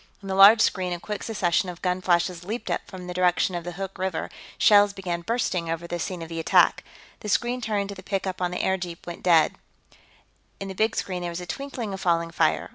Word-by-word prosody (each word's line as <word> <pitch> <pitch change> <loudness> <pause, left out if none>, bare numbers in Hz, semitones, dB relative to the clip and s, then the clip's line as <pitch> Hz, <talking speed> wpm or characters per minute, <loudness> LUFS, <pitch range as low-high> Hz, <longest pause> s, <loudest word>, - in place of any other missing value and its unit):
In - - -8
the - - -1
large 200 +4 +8
screen, 185 -4 +1
a 175 - -4
quick 210 +3 -5
succession 185 -4 0
of 175 -1 -9
gun 180 0 0
flashes 175 -1 +1
leaped 220 +6 -4
up - - 0
from 185 -2 -9
the 180 - -5
direction 180 +1 +2
of 175 -1 -3
the 175 +1 -6
Hoork 195 +1 -6
River 190 -3 -1
and - - -9 0.3
shells 205 -1 +5
began 180 -3 -4
bursting 180 -4 -1
over 165 +1 -3
the 175 0 -4
scene 175 0 -4
of - - -8
the 165 0 -5
attack. 165 - +4 0.4
The 210 - -6
screen 240 +4 0
tuned 205 -3 -1
to - - -4
the 185 - -10
pickup 190 -1 -3
on 180 - +1
the 180 - -3
airjeep 180 -3 -2
went 175 -1 -7
dead; 165 -3 +4 1.1
in 195 - -5
the - - -5
big 220 +3 +1
screen, 180 -2 -3
there 175 - -3
was 170 0 -5
a 180 - -7
twinkling 245 -1 -5
of 190 - -6
falling 170 -1 +1
fire. 160 -2 +1
185 Hz, 240 wpm, -25 LUFS, 175-200 Hz, 1.1 s, large